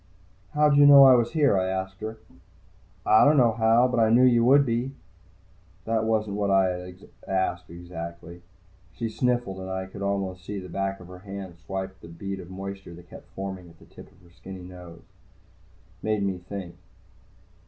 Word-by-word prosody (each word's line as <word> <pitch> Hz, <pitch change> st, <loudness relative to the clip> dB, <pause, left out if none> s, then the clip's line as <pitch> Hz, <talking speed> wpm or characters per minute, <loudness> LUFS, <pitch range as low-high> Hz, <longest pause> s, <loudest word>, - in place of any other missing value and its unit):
"How'd 150 Hz, -1 st, +4 dB
you 145 Hz, 0 st, +7 dB
know 140 Hz, -1 st, +10 dB
I 135 Hz, -1 st, +8 dB
was 120 Hz, +1 st, +2 dB
here?" 145 Hz, -8 st, +3 dB
I 95 Hz, -, -1 dB
asked 95 Hz, +1 st, -4 dB
her. 110 Hz, +1 st, -5 dB, 0.9 s
"I 110 Hz, -, +6 dB
don't 145 Hz, +1 st, +5 dB
know 120 Hz, -3 st, +5 dB
how. 115 Hz, +2 st, +3 dB
But 125 Hz, -1 st, -1 dB
I 110 Hz, -1 st, +4 dB
knew 120 Hz, +3 st, +5 dB
you 120 Hz, -2 st, +5 dB
would 140 Hz, +3 st, +5 dB
be." 120 Hz, +2 st, -2 dB, 0.9 s
That 110 Hz, 0 st, 0 dB
wasn't 110 Hz, -2 st, -1 dB
what 100 Hz, -1 st, 0 dB
I 95 Hz, -1 st, +3 dB
had 90 Hz, +1 st, -8 dB, 0.2 s
asked, 95 Hz, -2 st, -2 dB
exactly. 85 Hz, 0 st, -9 dB, 0.5 s
She 115 Hz, -, -4 dB
sniffled, 120 Hz, -5 st, -1 dB
and 95 Hz, 0 st, -7 dB
I 95 Hz, 0 st, -3 dB
could 95 Hz, +1 st, -11 dB
almost 100 Hz, -2 st, -3 dB
see 100 Hz, +2 st, -6 dB
the 90 Hz, -1 st, -10 dB
back 95 Hz, +2 st, -3 dB
of 90 Hz, -, -12 dB
her 90 Hz, 0 st, -11 dB
hand 95 Hz, -2 st, -9 dB
swipe 95 Hz, +2 st, -4 dB
at 95 Hz, -2 st, -29 dB
the -, -, -11 dB
bead 95 Hz, +4 st, -6 dB
of 90 Hz, -, -10 dB
moisture 95 Hz, -1 st, -8 dB
that 85 Hz, 0 st, -16 dB
kept -, -, -13 dB
forming 95 Hz, -2 st, -6 dB
at 85 Hz, -, -19 dB
the -, -, -18 dB
tip -, -, -15 dB
of -, -, -25 dB
her 85 Hz, -, -20 dB
skinny 95 Hz, +1 st, -11 dB
nose. 90 Hz, -2 st, -12 dB, 1.0 s
Made 110 Hz, -2 st, -1 dB
me 95 Hz, -2 st, -2 dB
think. 90 Hz, -1 st, -8 dB
95 Hz, 195 wpm, -25 LUFS, 90-115 Hz, 1.0 s, know